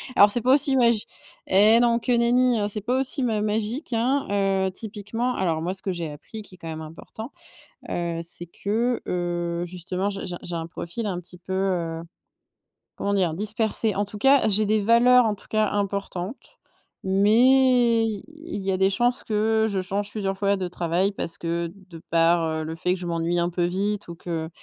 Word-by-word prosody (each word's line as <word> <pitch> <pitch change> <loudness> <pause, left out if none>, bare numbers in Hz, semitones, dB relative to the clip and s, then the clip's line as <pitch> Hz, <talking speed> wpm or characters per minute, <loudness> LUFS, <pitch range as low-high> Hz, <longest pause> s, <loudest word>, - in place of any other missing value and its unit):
alors 205 - +8
c'est 235 +4 -1
pas 255 +3 +4
aussi 275 -1 +4
magi 235 -4 +3 0.5
eh 210 +4 +6
non, 235 -1 +3
que 250 - -2
nenni, 240 +1 +3
hein, 205 - 0
c'est 210 0 -4
pas 250 +5 0
aussi 265 +1 -1
ma 220 -4 0
magique 220 +6 -2
hein, 255 +5 +1 0.4
heu, - - -3
typiquement 220 +4 -3
alors 165 -4 0
moi 175 +3 -2
ce 190 - -8
que 195 - -2
j'ai 170 -3 -4
appris 180 +9 -9
qui 190 - -15
est - - -20
quand 165 - -10
même 160 0 -5
important, 195 - -9 0.6
heu, 170 -1 -2
c'est 170 +1 -5
que, 225 +7 -1
heu, 175 -1 -2
justement, 180 +2 -3
j'ai - - -4
j'ai 180 - -5
j'ai 175 - -4
un 165 -1 -4
profil 170 +6 -5
un 185 -3 -2
petit 180 0 -11
peu, 185 +2 -7
heu, 175 -4 -1 1.0
comment 200 - -1
dire? 185 -5 +1
Dispersé. 215 +2 -1
En 200 - +1
tout 205 +1 -8
cas, 270 +4 +4
j'ai 215 +1 +2
des 215 +1 +2
valeurs 240 +3 +5
en 215 -2 0
tout - - -16
cas 215 -1 +2
importantes, 200 +1 -4 0.5
mais 235 +4 +4
i 215 -3 -3
il 310 -6 -7
y 195 - +1
a 185 - 0
des 190 +1 +3
chances 240 +5 +1
que 220 +1 +1
je 200 -2 -1
change 200 +2 -3
plusieurs 195 -3 -2
fois 200 0 +1
de 185 -1 -3
travail 175 +2 0
parce 165 -4 -4
que 170 0 -2 0.2
de 165 -2 -11
par, 165 0 +3
heu, 160 0 -2
le 160 +1 -5
fait 180 +2 0
que - - -10
je 180 - -6
m'ennuie 170 +1 0
un 170 0 +1
peu 175 0 -1
vite, 200 +3 -2
ou 170 - -6
que, 165 -2 -4
200 Hz, 205 wpm, -24 LUFS, 175-225 Hz, 1.0 s, alors